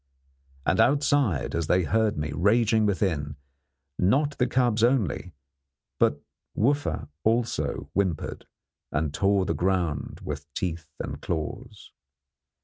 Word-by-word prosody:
And - - +2
outside, 140 - +2
as 85 -2 -1
they 90 +2 +3
heard 110 +2 +1
me 75 0 -2
raging 110 +6 +3
within, 80 -8 -1 0.6
not 140 +10 +2
the 125 - +3
cubs 120 -4 +2
only 100 - +1 0.6
but 70 - +3 0.4
Wooffa 140 +6 +1 0.2
also 115 +1 0
whimpered 95 -6 -2 0.4
and 75 -1 -1
tore 100 +2 +2
the - - 0
ground 85 -5 -1
with - - -6
teeth 85 -3 -3
and - - -5
claws. 100 +8 -5
100 Hz, 115 wpm, -26 LUFS, 80-115 Hz, 0.6 s, they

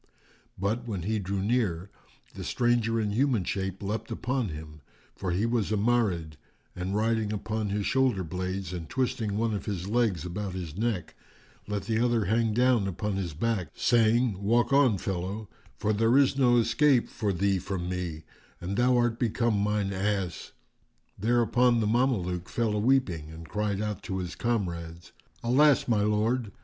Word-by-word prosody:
But, 110 +6 -2
when 100 -6 -3
he 110 +3 0
drew 95 0 -2
near, 100 -5 0 0.4
the - - -7
stranger 120 -2 +1
in 105 -2 0
human 120 -2 +2
shape 95 +1 -3
leapt 105 +3 -3
upon 125 -4 -2
him, 75 -1 -9 0.3
for 95 - -4
he 90 +5 +1
was 115 -3 0
a 110 - +2
Marid,[FN#401] 100 -8 +1 0.4
and 90 +2 -3
riding 110 0 +1
upon 110 0 -2
his 100 0 -1
shoulderblades 95 -7 -1
and 85 -3 -6
twisting 115 -5 -1
one 115 0 0
of 100 - -4
his 95 -3 -3
legs 105 -7 +1
about 95 +1 -4
his 85 -4 -6
neck, 110 -4 -2 0.5
let 105 -2 -2
the 110 +2 0
other 120 -3 +2
hang 115 +2 +2
down 120 -2 +3
upon 100 +2 -2
his 85 -6 -3
back, 105 0 -1
saying, 115 -3 +2
"Walk 120 +6 +2
on, 135 -7 +5
fellow; 95 +4 -4 0.3
for 110 - 0
there 115 +4 +3
is 140 -1 +4
no 125 -3 +4
escape 125 +3 +3
for 105 -3 -2
thee 95 +1 +1
from 90 -1 -4
me 90 -3 -4 0.4
and 95 +4 -4
thou 125 0 +4
art 120 -1 +1
become 115 -1 +1
mine 105 -1 0
ass." 95 -2 -2 0.7
Thereupon 120 +2 +3
the 110 - +1
Mameluke 105 -7 0
fell 115 -3 0
a 105 - 0
weeping 105 - +1
and 80 +1 -10
cried 105 +1 -1
out 105 -2 -3
to 95 - -4
his 90 -1 -4
comrades, 85 -8 -3 0.3
"Alas, 140 +4 +4
my 110 -4 +2
lord! 105 +2 +1
105 Hz, 165 wpm, -28 LUFS, 95-120 Hz, 0.7 s, on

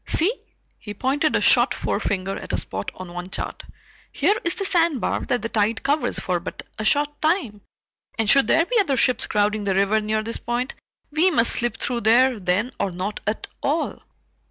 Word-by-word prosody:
"See" 365 +8 +3 0.5
he 210 -1 -8
pointed 285 +7 +1
a - - +2
short - - +4
forefinger 195 0 -2
at - - -6
a - - +2
spot - - -3
on 185 -1 -9
one 175 +1 -6
chart - - -5 0.5
"here 410 - +2
is 340 - -1
the 395 - -3
sandbar 335 -8 +1
that 245 - 0
the 230 - -2
tide 220 +1 0
covers 275 -2 0
for 180 -1 -1
but 170 - -7 0.2
a - - -2
short 290 +6 +1
time, 310 - 0 0.6
and 225 -2 0
should 275 +5 +5
there 330 +1 +4
be 475 +4 +1
other 290 -10 +1
ships 250 0 +2
crowding 210 0 +1
the 195 -1 +1
river 200 +3 +2
near 215 +1 -1
this 230 +1 -3
point, 240 +2 -2 0.4
we 320 +5 +3
must 240 -9 +3
slip 240 -2 -1
through 240 0 -2
there 240 +2 +4
then 190 +7 0
or 200 - 0
not 185 +4 -4
at 215 - -1 0.2
all." 305 +4 -1
235 Hz, 195 wpm, -23 LUFS, 205-290 Hz, 0.6 s, should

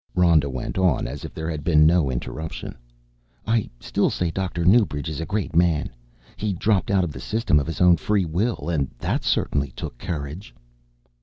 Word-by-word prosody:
Rhoda 85 -5 +4
went 65 +7 -4
on 90 -8 +2
as 70 +4 -6
if - - -6
there 80 0 -5
had 80 -3 -4
been 75 -2 +5
no 80 -3 +4
interruption. 75 +6 -5 0.7
"I 110 -2 +1
still - - 0
say 85 -2 -1
Dr. 90 -2 -2
Newbridge 95 -8 +3
is 80 0 -4
a 80 - -4
great 105 -5 -2
man. 85 -3 +2 0.5
He 105 -1 -1
dropped 100 +2 +1
out 95 -2 +3
of 85 - -2
the 65 - -8
System 75 - +1
of 70 - -3
his 80 - -4
own 90 -1 +6
free 100 +3 +1
will 95 +9 -1
and 75 -6 0
that - - -2
certainly 70 -1 0
took - - -7
courage!" 80 +4 -6
85 Hz, 185 wpm, -23 LUFS, 75-95 Hz, 0.7 s, own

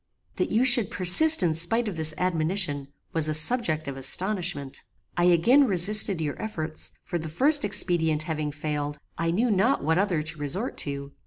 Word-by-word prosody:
"That - - -3
you 230 +4 -1
should 245 -5 +3
persist 200 - +7
in 165 -3 -1
spite 195 +9 -1
of 200 - -7
this 160 -1 +3
admonition, 165 -4 -4 0.3
was 160 -2 -1
a 155 - -1
subject 155 - +1
of 140 - -7
astonishment. 145 -1 -2 0.3
I 175 - -1
again 235 - +2
resisted 195 0 +4
your 150 -3 -7
efforts; 160 -8 -6
for 175 - -6
the 160 0 -9
first 285 - +2
expedient 160 -6 -1
having 155 -2 -6
failed, 145 0 -7 0.2
I 165 0 -3
knew 220 +8 -2
not 205 - -1
what 160 +4 -2
other 185 -6 -3
to 155 0 -10
resort 180 - -6
to. 140 0 -9
170 Hz, 175 wpm, -23 LUFS, 155-205 Hz, 0.3 s, persist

